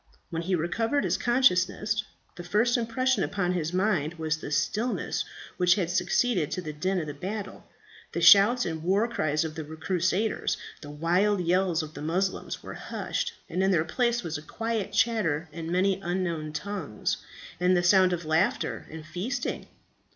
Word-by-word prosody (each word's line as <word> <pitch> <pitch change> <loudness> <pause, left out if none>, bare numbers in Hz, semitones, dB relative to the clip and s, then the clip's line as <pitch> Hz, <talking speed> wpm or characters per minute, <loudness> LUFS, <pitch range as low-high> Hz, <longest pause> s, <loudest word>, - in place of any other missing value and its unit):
When 165 -1 -2
he 185 +2 0
recovered 225 - 0
his - - +1
consciousness, 215 -3 +2 0.3
the 175 - -8
first 215 +7 +2
impression 255 +2 +1
upon 180 -3 -1
his 165 -3 -1
mind 180 -4 +1
was 160 -1 -1
the 160 - -7
stillness 220 - -1 0.3
which 180 0 +4
had 180 -4 -1
succeeded 180 -1 +1
to - - -2
the 155 -2 -5
din 180 +1 -1
of 145 -1 -7
battle; 205 +3 -5 0.4
the - - -2
shouts 220 +5 +7
and 160 -2 -3
war 195 +7 +2
cries 165 -9 0
of 155 - -4
the 160 0 -5
crusaders, 175 +7 -1 0.2
the 145 - -9
wild 175 +7 +1
yells 175 -1 +1
of 155 0 -9
the 145 - -8
Moslems, 180 +5 -2
were - - -7
hushed, - - -3
and 185 - -2
in 190 - +3
their 165 -4 +2
place 240 +2 0
was 155 -3 -3
a - - -11
quiet 225 +5 -3
chatter 175 -9 +1
in 165 +1 -6
many 190 +2 +2
unknown 170 -4 -2
tongues, 185 - -3 0.4
and 180 +1 +3
the 175 - +1
sound 185 +1 +5
of 175 -2 -2
laughter 160 +4 0
and 160 0 -9
feasting. 215 - -3
180 Hz, 170 wpm, -27 LUFS, 160-210 Hz, 0.4 s, shouts